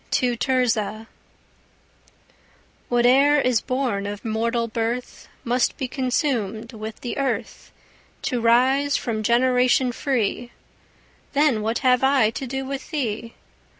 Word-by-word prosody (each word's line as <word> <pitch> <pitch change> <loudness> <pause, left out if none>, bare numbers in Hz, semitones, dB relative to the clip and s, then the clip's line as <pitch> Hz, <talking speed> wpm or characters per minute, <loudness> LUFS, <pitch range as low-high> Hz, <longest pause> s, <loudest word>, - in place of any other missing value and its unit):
TO 245 -2 +1
TIRZAH 225 -4 0 1.8
Whate'er 260 +5 +4
is 250 -5 +2
born 250 -7 -2
of 205 +1 -7
mortal 230 +1 -1
birth 230 +2 -4 0.2
Must 245 +1 0
be 260 - -3
consumèd 245 - -2
with 220 0 -8
the 245 - -4
earth, 275 -1 -3 0.5
To 250 -4 -1
rise 260 +5 +3
from 220 -2 -3
generation 250 +2 +3
free: 240 -2 -2 0.8
Then 280 -6 +2
what 225 +2 -1
have 250 0 +4
I 265 -5 +4
to 265 +3 -5
do 270 +2 -4
with 270 0 -6
thee? 230 -7 -3
245 Hz, 115 wpm, -23 LUFS, 225-265 Hz, 1.8 s, Whate'er